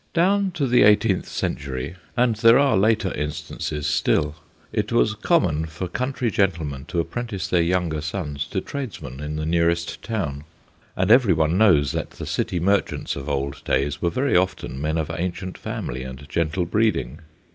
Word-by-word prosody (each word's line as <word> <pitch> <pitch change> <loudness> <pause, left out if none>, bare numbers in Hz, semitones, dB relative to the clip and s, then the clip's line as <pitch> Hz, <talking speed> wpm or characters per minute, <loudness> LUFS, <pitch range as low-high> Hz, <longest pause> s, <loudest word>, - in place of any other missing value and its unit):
Down 195 +3 +3
to 155 -5 0
the 125 -1 +4
eighteenth 105 -2 +4
century 70 +3 -3 0.2
and 120 -2 +3
there 115 +2 +6
are 140 0 +4
later 105 -1 +2
instances 75 0 -4
still 75 0 +1 0.4
it - - -1
was - - +3
common 80 +2 +1
for 85 +4 -5
country 125 +4 -2
gentlemen 80 -9 -1
to 85 - -2
apprentice 100 0 -3
their 90 -1 +2
younger 85 -3 0
sons 75 -3 -4
to 95 - -2
tradesmen 90 - -6
in 75 +1 -4
the 75 0 -3
nearest 85 +1 0
town, 75 -11 -3 0.5
and 95 +3 +1
every 120 -6 +6
one 80 +1 +1
knows 85 - +4
that - - -3
the - - -8
City 90 - -1
merchants 100 +4 0
of 70 +1 -6
old 70 -1 -2
days 70 +2 0
were 85 - +2
very 130 +9 0
often 90 -6 0
men 80 +2 0
of 80 -2 -2
ancient 90 +1 -4
family 65 +1 -5
and 65 +2 -8
gentle 85 +3 0
breeding. 105 - 0
85 Hz, 170 wpm, -23 LUFS, 75-105 Hz, 0.5 s, there